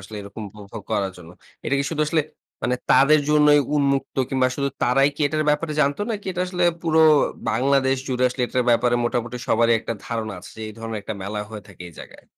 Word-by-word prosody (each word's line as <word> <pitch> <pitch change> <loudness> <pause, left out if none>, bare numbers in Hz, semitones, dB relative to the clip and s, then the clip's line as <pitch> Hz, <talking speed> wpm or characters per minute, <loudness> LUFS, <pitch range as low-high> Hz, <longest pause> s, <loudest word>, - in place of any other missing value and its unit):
আসলে 100 +3 -10
এরকম 100 +2 -9 0.2
উপভোগ 100 +1 -9
করার 95 -1 0
জন্য। 85 -1 -13 0.3
এটা - - 0
কি 140 - 0
শুধু 155 -2 0
আসলে 155 +1 +2 0.4
মানে 125 +2 +1 0.2
তাদের 140 +4 +6
জন্যই 150 -1 +5
উন্মুক্ত? 140 -2 0
কিংবা 130 -1 +2
শুধু 140 -1 0
তারাই 135 +3 +4
কি - - -11
এটার 155 +1 -1
ব্যাপারে 150 +1 -1
জানতো? 140 +4 +1
নাকি 210 -3 -5
এটা 180 - -4
আসলে 180 -1 -1 0.2
পুরো 160 -2 +1 0.5
বাংলাদেশ 135 +3 +2
জুড়ে 125 0 0
আসলে 125 +1 -4
এটার 125 0 -1
ব্যাপারে 120 +1 +3
মোটামুটি 120 0 -2
সবারই 115 +1 +3
একটা - - -4
ধারণা 110 -2 -4
আছে 95 +3 -12
যে - - -9
এই - - -8
ধরনের 115 -1 -5
একটা 110 - -5
মেলা 105 +2 -4
হয়ে 105 -2 -8
থাকে 95 -2 -12
এই - - -15
জায়গায়? - - -12
125 Hz, 210 wpm, -22 LUFS, 110-145 Hz, 0.5 s, তাদের